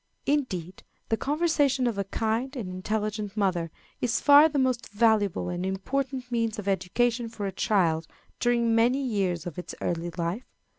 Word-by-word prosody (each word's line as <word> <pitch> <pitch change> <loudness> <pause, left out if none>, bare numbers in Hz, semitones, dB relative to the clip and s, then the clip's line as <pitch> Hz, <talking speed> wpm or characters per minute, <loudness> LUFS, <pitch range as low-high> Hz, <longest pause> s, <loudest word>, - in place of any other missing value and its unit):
Indeed, 190 - -1 0.3
the 225 - +3
conversation 290 -1 +1
of 230 -4 -1
a - - +1
kind 225 +7 -2
and 235 -7 -4
intelligent 210 +2 -3
mother 180 -5 0 0.3
is 230 -2 0
far 290 +2 +7
the 295 - -2
most 255 -3 0
valuable 205 -4 +2
and 175 0 -3
important 255 +7 -3
means 230 -1 0
of 205 -2 -6
education 230 +6 0
for 210 -3 -5
a 195 - -2
child 170 -5 +1 0.3
during 235 -1 +2
many 245 +4 +3
years 190 - -1
of 175 -1 -6
its 180 - -7
early 170 0 -2
life. 175 +8 -3
220 Hz, 160 wpm, -27 LUFS, 190-250 Hz, 0.3 s, far